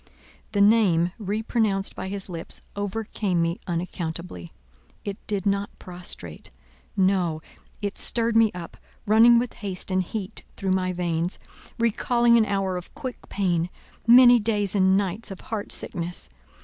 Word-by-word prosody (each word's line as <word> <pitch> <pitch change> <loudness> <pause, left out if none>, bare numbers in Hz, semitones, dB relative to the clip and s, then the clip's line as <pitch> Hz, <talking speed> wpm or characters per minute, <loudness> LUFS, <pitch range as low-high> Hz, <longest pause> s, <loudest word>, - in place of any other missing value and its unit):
The 200 - +2
name 200 -5 +4
re 210 +1 -2
pronounced 210 -4 0
by - - -5
his 195 0 -4
lips 170 -3 -1
overcame 205 -2 -2
me 165 +1 0
unaccountably. 170 - -5 0.5
It 200 -1 -4
did 200 -3 -1
not 200 0 0
prostrate—no, 180 -1 -3 0.4
it 200 -1 -2
stirred 230 -1 +1
me 225 -2 +5
up, 170 -2 -8 0.3
running 225 +3 +6
with 240 0 -1
haste 195 -2 -4
and 185 0 +2
heat 190 +1 -5 0.2
through 190 -1 -1
my 185 -1 +1
veins—recalling 200 +7 0
an 225 -2 +4
hour 195 -2 -1
of 180 - -9
quick 265 -4 -7
pain, 175 -3 0 0.4
many 245 0 +8
days 205 -3 0
and 190 -1 +4
nights 200 +2 -2
of 195 - -8
heart 215 -2 -5
sickness. 170 - +1
195 Hz, 135 wpm, -25 LUFS, 180-220 Hz, 0.5 s, many